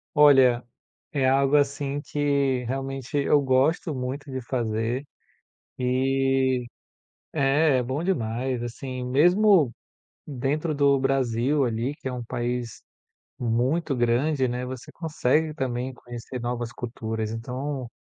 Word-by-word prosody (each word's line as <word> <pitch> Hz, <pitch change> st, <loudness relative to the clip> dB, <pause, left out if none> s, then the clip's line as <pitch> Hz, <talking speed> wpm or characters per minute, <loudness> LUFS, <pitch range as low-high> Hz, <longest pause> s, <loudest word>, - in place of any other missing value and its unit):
Olha, 135 Hz, -5 st, +6 dB, 0.5 s
é 135 Hz, -3 st, +2 dB
algo 135 Hz, +1 st, +3 dB
assim 140 Hz, 0 st, 0 dB
que 140 Hz, -4 st, 0 dB
realmente 135 Hz, +1 st, -4 dB
eu 145 Hz, +1 st, +4 dB
gosto 140 Hz, +4 st, +2 dB
muito 130 Hz, +3 st, -4 dB
de 130 Hz, 0 st, -3 dB
fazer, 120 Hz, +1 st, -1 dB, 0.7 s
eh 130 Hz, 0 st, +1 dB, 0.7 s
é, 145 Hz, 0 st, +3 dB
é 125 Hz, -, +1 dB
bom 130 Hz, +6 st, -3 dB
demais, 125 Hz, -6 st, -1 dB
assim. 125 Hz, +2 st, -5 dB
Mesmo 175 Hz, -, +4 dB, 0.6 s
dentro 145 Hz, +3 st, -1 dB
do 140 Hz, -1 st, +4 dB
Brasil 135 Hz, +1 st, +1 dB
ali, 120 Hz, +3 st, -1 dB
que -, -, -7 dB
é 130 Hz, -, -2 dB
um 125 Hz, -, -4 dB
país 120 Hz, -1 st, -3 dB, 0.6 s
muito 130 Hz, +7 st, 0 dB
grande, 130 Hz, +3 st, +2 dB
né, 125 Hz, +1 st, -3 dB
você 130 Hz, 0 st, -8 dB
consegue 155 Hz, -1 st, 0 dB
também 130 Hz, -2 st, -3 dB
conhecer 120 Hz, +1 st, -8 dB
novas 120 Hz, 0 st, -3 dB
culturas, 110 Hz, -2 st, -4 dB
então 125 Hz, +3 st, -4 dB
130 Hz, 120 wpm, -25 LUFS, 120-140 Hz, 0.7 s, Olha